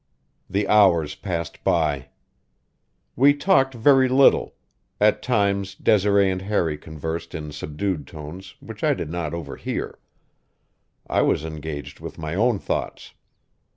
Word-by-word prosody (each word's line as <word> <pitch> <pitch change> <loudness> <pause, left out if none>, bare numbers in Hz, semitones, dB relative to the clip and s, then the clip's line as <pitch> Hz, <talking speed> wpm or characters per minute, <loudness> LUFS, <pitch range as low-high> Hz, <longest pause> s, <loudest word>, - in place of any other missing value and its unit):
The 100 +2 0
hours 90 -8 +4
passed 85 -4 -5
by. 75 -6 +1 1.1
We 140 +3 +5
talked 140 -5 +2
very 130 +2 +4
little; 135 +2 +4 0.4
at 105 +1 +3
times 100 -5 0
Desiree 100 -1 +3
and 95 0 -3
Harry 95 -6 0
conversed 80 +2 -6
in 75 -1 -6
subdued 75 0 -4
tones 80 +4 -10
which - - -10
I - - +3
did 75 - -5
not 85 -2 -3
overhear; 80 -5 -5 1.1
I - - +1
was 75 - +1
engaged 80 -2 -7
with - - -9
my 80 0 -5
own 115 +4 +2
thoughts. - - -4
95 Hz, 125 wpm, -23 LUFS, 80-105 Hz, 1.1 s, We